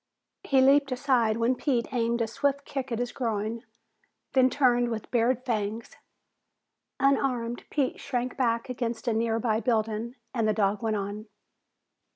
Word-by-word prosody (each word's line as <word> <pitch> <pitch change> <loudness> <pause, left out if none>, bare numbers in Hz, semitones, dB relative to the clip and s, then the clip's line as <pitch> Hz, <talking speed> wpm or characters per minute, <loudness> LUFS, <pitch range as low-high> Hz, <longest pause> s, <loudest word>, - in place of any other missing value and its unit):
He 270 -1 +3
leaped 275 +1 +4
aside 250 -4 +2
when 235 +2 +2
Pete 255 -1 -1
aimed 235 -1 +1
a - - -2
swift 280 +4 -1
kick 265 -2 -4
at 230 - -1
his 245 +1 -2
groin, 225 -2 -2 0.7
then 260 -1 +5
turned 245 -3 +3
with 225 -2 -5
bared 245 +1 +1
fangs. 220 -2 -3 1.0
Unarmed, 255 -4 +1
Pete 280 -3 -1
shrank 250 -1 -3
back 235 -3 0
against 240 -1 -4
a 235 - +2
near 225 0 +1
by 220 -1 +1
building 225 0 -1 0.2
and 230 -4 +1
the 215 - +3
dog 205 -1 +1
went 220 -1 0
on. 205 +2 -4
235 Hz, 155 wpm, -27 LUFS, 225-255 Hz, 1.0 s, then